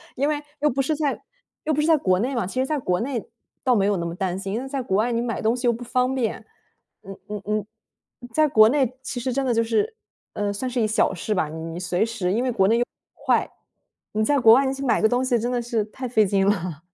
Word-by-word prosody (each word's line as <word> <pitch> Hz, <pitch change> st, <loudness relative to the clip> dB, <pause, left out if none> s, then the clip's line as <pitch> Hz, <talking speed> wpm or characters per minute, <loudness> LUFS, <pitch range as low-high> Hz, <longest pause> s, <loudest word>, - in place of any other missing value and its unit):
因 280 Hz, +3 st, +1 dB
为 295 Hz, -1 st, -2 dB, 0.2 s
又 300 Hz, -, +4 dB
不 270 Hz, +1 st, 0 dB
是 305 Hz, +4 st, 0 dB
在 290 Hz, -2 st, -1 dB, 0.4 s
又 310 Hz, -, 0 dB
不 300 Hz, -, +1 dB
是 300 Hz, -, 0 dB
在 325 Hz, -1 st, +5 dB
国 185 Hz, -9 st, +2 dB
内 255 Hz, +6 st, -1 dB
嘛， 235 Hz, -, 0 dB
其 195 Hz, +8 st, -4 dB
实 260 Hz, -, +2 dB
在 305 Hz, +2 st, -1 dB
国 180 Hz, -9 st, 0 dB
内 240 Hz, -2 st, -3 dB, 0.4 s
倒 255 Hz, -2 st, +3 dB
没 195 Hz, -3 st, +2 dB
有 200 Hz, -1 st, +2 dB
那 170 Hz, -, -3 dB
么 170 Hz, -, -3 dB
担 185 Hz, 0 st, -2 dB
心， 195 Hz, 0 st, -4 dB
因 230 Hz, -, -1 dB
为 265 Hz, -, -6 dB
在 270 Hz, 0 st, -3 dB
国 195 Hz, -6 st, 0 dB
外 230 Hz, +4 st, +1 dB
你 235 Hz, 0 st, 0 dB
买 235 Hz, -2 st, -3 dB
东 225 Hz, +2 st, +2 dB
西 250 Hz, 0 st, -1 dB
又 240 Hz, -, +4 dB
不 235 Hz, +2 st, -7 dB
方 250 Hz, +1 st, 0 dB
便。 250 Hz, -4 st, -2 dB, 0.6 s
嗯 195 Hz, 0 st, -9 dB
嗯 210 Hz, -1 st, -5 dB
嗯， 210 Hz, 0 st, -1 dB, 0.7 s
在 310 Hz, +3 st, +4 dB
国 220 Hz, -5 st, +6 dB
内 260 Hz, -2 st, +1 dB
其 260 Hz, -1 st, -5 dB
实 255 Hz, +1 st, -2 dB
真 270 Hz, +1 st, 0 dB
的 245 Hz, -, +2 dB
就 230 Hz, -, +2 dB
是， 230 Hz, -, 0 dB, 0.4 s
呃， 205 Hz, -1 st, -1 dB
算 255 Hz, +5 st, -3 dB
是 245 Hz, -, -1 dB
一 220 Hz, -, +2 dB
小 215 Hz, -2 st, +2 dB
事 210 Hz, +4 st, -2 dB
吧， 160 Hz, -5 st, 0 dB
你 160 Hz, +1 st, -7 dB
你 165 Hz, +1 st, -6 dB
随 180 Hz, +3 st, 0 dB
时， 225 Hz, -6 st, -2 dB
因 220 Hz, +5 st, +1 dB
为 255 Hz, -, 0 dB
国 195 Hz, -5 st, +3 dB
内 225 Hz, +3 st, +3 dB
又 240 Hz, -, +1 dB, 0.3 s
快。 -, -, +1 dB, 0.7 s
你 215 Hz, -, +2 dB
在 285 Hz, +6 st, +2 dB
国 225 Hz, -3 st, +8 dB
外 265 Hz, +2 st, +4 dB
去 270 Hz, +1 st, -5 dB
买 240 Hz, -, +2 dB
个 220 Hz, -, +4 dB
东 245 Hz, +2 st, +1 dB
西， 245 Hz, -2 st, +2 dB
真 240 Hz, +3 st, -2 dB
的 245 Hz, -, 0 dB
是 230 Hz, -2 st, -1 dB
太 255 Hz, +4 st, -7 dB
费 225 Hz, -3 st, +3 dB
劲 195 Hz, 0 st, +1 dB
了。 180 Hz, -6 st, -1 dB
230 Hz, 295 characters per minute, -23 LUFS, 200-260 Hz, 0.7 s, 国